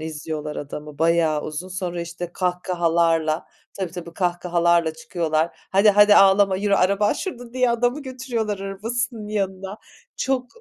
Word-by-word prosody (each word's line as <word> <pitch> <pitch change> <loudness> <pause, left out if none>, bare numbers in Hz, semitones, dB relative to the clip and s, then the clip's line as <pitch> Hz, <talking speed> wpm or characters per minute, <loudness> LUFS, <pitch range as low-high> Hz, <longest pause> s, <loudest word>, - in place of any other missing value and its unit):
izliyorlar 155 -1 -5
adamı, 150 0 -7
bayağı 165 -2 +2
uzun. 155 +4 -6
Sonra 180 -2 -4
işte 170 0 -6
kahkahalarla, 170 -3 0 0.3
tabii 190 -3 -4
tabii, 170 -1 -8
kahkahalarla 175 -2 +1
çıkıyorlar. 160 0 -1
Hadi 200 +2 +5
hadi 205 +1 +6
ağlama, 195 -1 +5
yürü 200 +1 +1
araban 200 +2 +2
şurada 245 -9 -6
diye 255 -1 +2
adamı 245 +5 0
götürüyorlar 245 -6 -3
arabasının 220 +3 -4
yanına. 195 -1 -3 0.4
Çok 260 -2 -1
185 Hz, 130 wpm, -22 LUFS, 165-210 Hz, 0.4 s, hadi